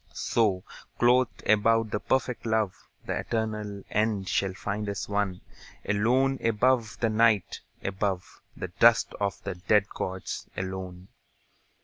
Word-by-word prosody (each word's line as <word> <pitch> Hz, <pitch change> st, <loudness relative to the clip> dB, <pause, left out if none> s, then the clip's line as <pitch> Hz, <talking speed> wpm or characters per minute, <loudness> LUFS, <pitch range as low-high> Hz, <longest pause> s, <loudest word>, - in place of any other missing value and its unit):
So, 100 Hz, -6 st, +1 dB, 0.3 s
clothed 125 Hz, +1 st, +2 dB
about 110 Hz, +1 st, +3 dB
with 105 Hz, -, -3 dB
perfect 125 Hz, -3 st, 0 dB
love, 110 Hz, -4 st, +1 dB, 0.3 s
The -, -, -2 dB
eternal 105 Hz, -3 st, -3 dB
end 105 Hz, -2 st, 0 dB
shall 95 Hz, -1 st, 0 dB
find 105 Hz, +2 st, -3 dB
us 100 Hz, -, -3 dB
one, 100 Hz, -3 st, -1 dB, 0.5 s
Alone 125 Hz, +6 st, +2 dB
above 115 Hz, 0 st, +2 dB
the 115 Hz, -, +3 dB
Night, 110 Hz, -3 st, +2 dB, 0.2 s
above 95 Hz, -1 st, -3 dB, 0.2 s
The 95 Hz, -, -5 dB
dust 115 Hz, +6 st, +4 dB
of 100 Hz, -1 st, -1 dB
the -, -, -3 dB
dead 100 Hz, +3 st, +2 dB
gods, 95 Hz, -1 st, -5 dB
alone. 95 Hz, -1 st, -5 dB
105 Hz, 125 wpm, -27 LUFS, 95-115 Hz, 0.5 s, dust